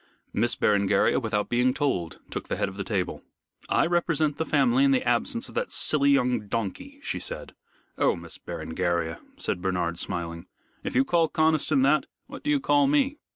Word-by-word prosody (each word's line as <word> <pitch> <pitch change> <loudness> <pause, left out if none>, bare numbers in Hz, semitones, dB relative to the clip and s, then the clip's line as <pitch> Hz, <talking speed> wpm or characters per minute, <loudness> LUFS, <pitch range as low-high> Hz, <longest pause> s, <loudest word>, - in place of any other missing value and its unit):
Miss 120 +3 +1
Berengaria 100 -1 +3
without 110 -4 -1
being 125 +2 +2
told 110 - -1
took - - -5
the - - -2
head - - 0
of 95 - -8
the 100 - -3
table. 95 -3 -2 0.5
"I - - +3
represent 165 -4 +1
the 160 - -2
family 255 +2 +3
in 280 - +5
the 265 -1 +2
absence 235 +3 0
of - - -13
that 480 +1 -2
silly 140 -2 +2
young 125 -6 +2
donkey," 100 -2 -4
she - - -3
said. - - -6 0.5
"Oh, - - +3
Miss - - -8
Berengaria," 85 -1 -2 0.2
said 90 - -2
Bernard, 90 -2 -1
smiling, 85 -2 -3 0.4
"if - - -4
you 130 +2 +4
call 165 0 +2
Conniston 155 -3 +2
that, 145 +3 +3 0.2
what 280 0 -10
do 295 - -3
you 295 -1 +3
call 285 +1 +3
me?" 285 0 +2
130 Hz, 185 wpm, -26 LUFS, -, 0.5 s, in